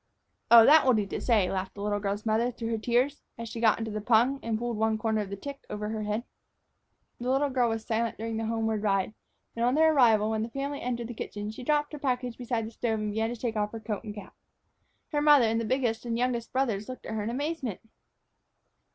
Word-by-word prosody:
"Oh, 230 -1 +9
that 310 +4 +7
will 260 - +4
do 210 -2 +1
to - - -5
say," 215 -7 +2
laughed 190 0 -3
the 200 - -6
little 205 0 0
girl's 200 +1 -3
mother 225 +2 +2
through 230 -2 -5
her 225 -1 -1
tears, 250 +6 +1 0.2
as 230 0 -6
she 230 +1 -6
got 220 -2 +4
into 225 -1 -4
the 215 0 -3
pung 240 +5 +3
and 225 -1 -1
pulled 240 0 -3
one 220 0 +1
corner 220 0 0
of 200 - -5
the 200 - -4
tick 280 +7 -7
over 210 0 -4
her 220 0 -3
head. 210 +2 -2 1.0
The 245 +1 -3
little 275 +2 +2
girl 250 -2 +2
was 225 -1 -3
silent 230 0 -1
during 225 0 -4
the 225 0 -2
homeward 225 -1 -1
ride; 195 -1 +1 0.4
and 230 - -1
on 250 +2 +3
their 315 +1 +5
arrival, 220 -6 +4
when 220 -1 -1
the 225 - -3
family 280 +3 -4
entered 240 -1 -3
the 240 - -6
kitchen, 210 -1 -5
she 220 - -9
dropped 295 +2 +1
her 300 - -6
package 250 -3 -1
beside 235 -2 -2
the 220 - -7
stove 225 -1 -1
and 210 0 -2
began 220 +2 0
to 240 -1 -6
take 230 -2 -2
off 210 0 -1
her 225 - -5
coat 220 -1 -4
and 210 -2 -7
cap. 205 -2 -10 0.8
Her 295 -2 +1
mother 295 -4 +6
and 225 +1 +1
the - - -3
biggest 240 -2 0
and 235 -1 -2
the - - -2
youngest 245 -2 -1
brothers 235 -6 -1
looked 255 - -8
at - - -5
her 220 - -2
in 210 - -2
amazement. 270 - -3
230 Hz, 250 wpm, -28 LUFS, 215-250 Hz, 1.0 s, Oh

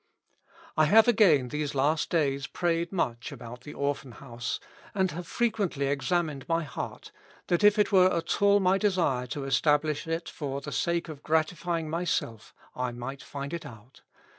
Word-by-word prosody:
" - - -25
I 155 - +6
have 220 +8 +6
again 180 - +4
these 150 0 -3
last 150 +3 +1
days 140 -4 0
prayed 170 -1 -1
much 120 -10 -2
about 120 +1 -9
the 150 +3 -10
Orphan 140 -3 -2
House, 120 -2 -5 0.4
and 190 -2 +1
have 170 +2 -6
frequently 205 -12 0
examined 145 +1 -1
my 165 0 +1
heart; 145 - -7 0.4
that 175 +2 +2
if 210 +1 +6
it 210 - +2
were 185 -1 +6
at 165 +3 -1
all 200 0 +6
my 190 0 +3
desire 170 -12 +1
to 140 +3 -4
establish 150 +2 +1
it 165 +1 -2
for 140 -3 -4
the - - -7
sake 170 0 0
of 155 -3 -8
gratifying 160 +1 0
myself, 155 -9 -2 0.2
I 125 -1 -2
might 125 +3 -6
find 140 +1 -6
it 170 - -4
out. 115 +3 -13
155 Hz, 170 wpm, -28 LUFS, 135-175 Hz, 0.4 s, I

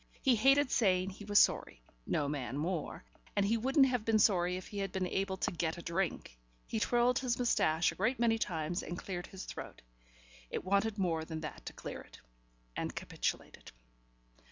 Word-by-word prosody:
He 260 -3 +5
hated 270 +4 +4
saying 190 -4 +2
he 205 +2 -11
was 205 0 +2
sorry - - +3 0.2
(no 145 - 0
man 140 -3 -3
more) 165 +2 -3 0.3
and 200 -1 +3
he 220 +3 +2
wouldn't 265 +5 +4
have 250 -4 0
been 220 0 +3
sorry 180 -4 +3
if 185 - -8
he 205 - -6
had 195 -2 -2
been 190 -1 -1
able 190 +1 -1
to - - -1
get 165 -1 -2
a 170 - -8
drink. 170 - -2 0.3
He 220 - -2
twirled 240 +2 +3
his 250 -3 0
moustache 170 -9 +2
a - - -10
great 225 +7 +1
many 230 -1 +2
times 175 -2 -2
and 175 - -6
cleared 180 -2 -5
his 190 - -8
throat - - -8 0.7
it - - -4
wanted 200 +3 +1
more 170 -5 0
than 160 -1 -6
that 155 - -7
to - - -5
clear - - -7
it - - -15 0.6
and - - -3
capitulated. - - -4
195 Hz, 190 wpm, -33 LUFS, 175-225 Hz, 0.7 s, He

